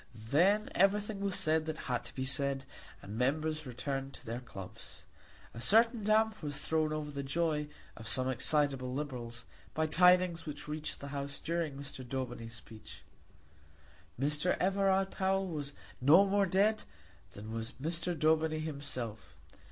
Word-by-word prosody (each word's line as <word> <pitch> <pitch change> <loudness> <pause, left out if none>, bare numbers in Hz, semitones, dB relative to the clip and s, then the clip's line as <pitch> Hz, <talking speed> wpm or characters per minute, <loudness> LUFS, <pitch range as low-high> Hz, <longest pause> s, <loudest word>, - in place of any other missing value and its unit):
Then 170 - +2
everything 205 +2 +2
was 200 -2 0
said 160 -3 +2
that 160 0 -3
had 125 -4 -2
to - - -8
be 130 - -2
said, 140 0 -1 0.4
and 105 +3 -6
members 155 +3 0
returned 135 +2 -4
to - - -15
their 115 +1 -3
clubs. 105 -3 -9 0.5
A 115 - -7
certain 230 - +5
damp 215 +1 +2
was 145 -3 -3
thrown 155 -1 0
over 155 -1 -3
the 140 -1 -4
joy 150 +1 0 0.3
of 115 - -9
some 130 +2 +2
excitable 135 0 +1
Liberals 125 -4 -5 0.3
by 160 - +2
tidings 180 0 +4
which 150 0 -6
reached 150 0 -4
the 140 - -6
House 140 0 -4
during 165 -4 -2
Mr. 140 -1 -7
Daubeny's 120 -3 -5
speech. 110 -2 -11 1.2
Sir 150 +4 +1
Everard 195 0 +2
Powell 195 0 +1
was 145 -4 -4 0.3
no 160 +10 +7
more 200 0 +2
dead 205 +4 +3 0.5
than 105 +2 -8
was 115 0 -4
Mr. 165 +3 0
Daubeny 155 +1 +3
himself. 140 -8 -5
150 Hz, 150 wpm, -33 LUFS, 130-180 Hz, 1.2 s, no